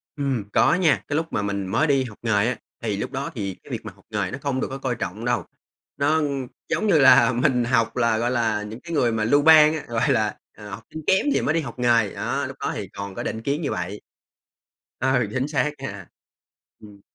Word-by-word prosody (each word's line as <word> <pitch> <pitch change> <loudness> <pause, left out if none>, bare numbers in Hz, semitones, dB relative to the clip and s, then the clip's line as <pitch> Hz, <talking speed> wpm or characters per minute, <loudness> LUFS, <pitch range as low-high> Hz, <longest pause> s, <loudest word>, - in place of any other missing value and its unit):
Ừm, 135 -7 -1
có - - +4
nha, 175 -5 +2
cái 145 - -2
lúc 160 - +1
mà - - 0
mình 100 -2 -2
mới 150 +11 +1
đi 135 -2 +3
học 115 -5 -9
nghề 110 -2 +2
á, 125 - -1 0.3
thì 105 -3 -1
lúc 105 - -4
đó 140 0 -4
thì 100 -4 -4
cái - - -13
việc - - -2
mà - - -6
học - - -24
nghề - - -2
nó 130 - -4
không 135 -2 -1
được - - -1
có 135 - -5
coi 130 -3 -2
trọng 110 +1 -5
đâu, 120 - 0 0.5
nó 155 +3 +2 0.5
giống 215 - 0
như 165 -6 +4
là 125 -3 +7
mình 125 0 +2
học 115 -2 +1
là, 115 -2 +2
gọi 120 +2 0
là, 110 -4 0
những 110 +3 -8
cái 170 0 -7
người 125 -6 +2
mà 110 -1 -1
lưu 145 +6 +4
ban 155 0 +7
á, 155 - -4
gọi 120 +4 +1
là, 110 -5 +1 0.2
à, 105 - -11
học 105 +2 -8
sinh 160 - -5
kém 190 +6 +3
thì - - +1
mới 155 - +1
đi 165 - +1
học 135 -3 -8
nghề, 115 -4 +3
đó, - - -2
lúc - - -9
đó - - -2
thì - - -5
còn 100 -1 -6
có - - -4
định 110 - -4
kiến 140 +6 -1
như 145 - -2
vậy. 90 +3 -4 1.0
Ừ, 130 -3 +2
chính 130 +1 -1
xác 150 0 0
nha. 100 -8 -7 0.7
Ừm. 100 -2 -15
120 Hz, 245 wpm, -23 LUFS, 110-140 Hz, 1.0 s, là